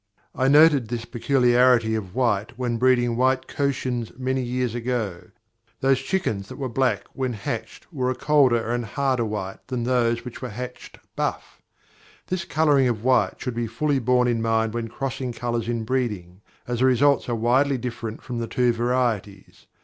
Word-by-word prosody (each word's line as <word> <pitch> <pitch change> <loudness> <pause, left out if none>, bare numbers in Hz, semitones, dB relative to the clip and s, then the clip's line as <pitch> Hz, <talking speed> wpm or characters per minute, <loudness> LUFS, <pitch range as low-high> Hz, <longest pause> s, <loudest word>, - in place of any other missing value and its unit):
I 130 - +1
noted 145 -3 +6
this 115 0 -4
peculiarity 125 -2 +3
of 105 -3 -4
white 115 -3 0
when 120 -2 -1
breeding 120 -1 +3
white 130 +1 +2
Cochins 130 -4 -2
many 130 0 -1
years 125 -1 -2
ago; 120 -7 -3 0.5
those 135 -1 +3
chickens 110 - -2
that - - -8
were 135 -2 -3
black 130 +2 +1
when 130 -2 -2
hatched 110 +1 -5
were 130 -3 0
a 130 - -1
colder 125 -7 +3
and 120 0 -1
harder 130 +2 0
white 105 -3 -4
than 125 -2 -3
those 120 -1 +1
which 125 - -8
were 130 - -4
hatched 125 +3 -8 0.2
buff. - - -3 0.6
This 180 -2 -3
colouring 145 -5 +3
of 115 -3 -2
white 130 0 +3
should 125 - -4
be 120 0 -2
fully 140 +5 0
borne 125 0 +2
in 120 -2 0
mind 110 -1 +1
when 120 -1 -3
crossing 130 +1 -4
colours 120 -1 -3
in 115 -1 -1
breeding, 105 -7 -3 0.3
as 120 -1 -2
the 130 - +4
results 130 +2 +3
are 120 - 0
widely 130 +5 +2
different 115 -2 -6
from 120 -2 -4
the 115 - -3
two 125 0 +2
varieties. 115 -5 -2
125 Hz, 170 wpm, -24 LUFS, 115-130 Hz, 0.6 s, noted